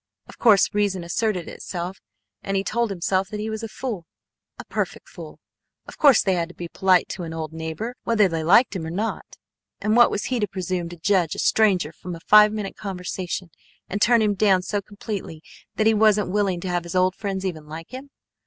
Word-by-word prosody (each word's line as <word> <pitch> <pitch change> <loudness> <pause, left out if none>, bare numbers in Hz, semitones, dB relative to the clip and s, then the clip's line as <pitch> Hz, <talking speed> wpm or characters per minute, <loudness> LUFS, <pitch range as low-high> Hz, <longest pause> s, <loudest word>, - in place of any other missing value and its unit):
Of - - -15
course 210 -5 +5
reason 200 -3 0
asserted 180 0 -1
itself, 180 +1 -6 0.4
and 195 0 -2
he 195 - 0
told 235 +2 0
himself 190 0 -1
that 210 -1 -5
he 220 +1 -3
was 220 0 -4
a 225 - -4
fool, 215 -7 -5 0.5
a - - -9
perfect - - -4
fool. - - -11 0.5
Of - - -12
course 280 -6 +6
they 190 - +2
had 170 -1 -1
to 175 - -14
be 175 - -6
polite 185 0 +3
to 185 - -5
an 165 -1 -6
old 160 -1 -5
neighbor 160 +9 -5
whether 215 -3 +3
they 165 -2 -3
liked 200 +8 +5
him 180 - -3
or 160 - -5
not. 205 +7 -4 0.4
And 215 +1 +1
what 240 0 +7
was 205 - -2
he 255 -2 -1
to 210 - 0
presume 185 -2 -3
to 175 - -10
judge 175 -1 +1
a - - -9
stranger 190 -8 +2
from 175 +3 -7
a - - -10
five 210 +2 +7
minute 210 -2 -4
conversation, 180 -2 -5 0.4
and 200 +2 -4
turn 235 0 +5
him 210 -1 +2
down 195 -2 +3
so 205 +2 -2
completely 200 -6 -7 0.3
that 215 - +1
he 220 - +5
wasn't 210 -3 +3
willing 195 -3 0
to 185 - -5
have 175 0 0
his 170 +1 -7
old 185 0 +3
friends 195 -1 -4
even 160 -5 -4
like 160 +2 -9
him? 265 +2 -8
195 Hz, 220 wpm, -23 LUFS, 175-215 Hz, 0.5 s, what